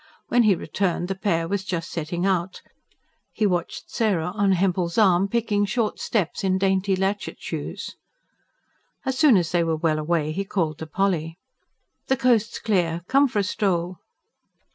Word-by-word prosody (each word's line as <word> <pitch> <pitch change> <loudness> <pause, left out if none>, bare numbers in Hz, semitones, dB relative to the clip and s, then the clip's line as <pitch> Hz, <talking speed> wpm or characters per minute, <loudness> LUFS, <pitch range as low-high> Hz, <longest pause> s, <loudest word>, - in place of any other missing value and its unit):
When 245 - +4
he 215 -4 +4
returned, 180 0 -2
the - - 0
pair 170 -4 -1
was 195 +1 -2
just 170 -3 -4
setting 170 +2 -3
out; 185 -1 -1 0.7
he 215 - 0
watched 175 -3 -2
Sarah, 190 -8 0
on 200 -2 +2
Hempel's 180 -2 0
arm, 195 -3 +4
picking 215 -2 0
short 210 +1 -1
steps 200 -6 -1
in 190 -1 +2
dainty 190 0 +1
latchet 195 +2 -2
shoes. - - -6 1.1
As 265 -1 -1
soon 290 -9 +6
as 170 -3 0
they 175 -1 +2
were 165 -1 0
well 155 -1 +1
away 155 -1 0
he 195 +5 -2
called 165 -6 -2
to 160 - -6
Polly. 165 -2 -1 0.7
"The 265 - +2
coast's 235 -3 +2
clear. 175 -6 0
Come 275 +2 +4
for 235 - -5
a 205 - +3
stroll." 185 -2 -1
190 Hz, 165 wpm, -24 LUFS, 170-205 Hz, 1.1 s, soon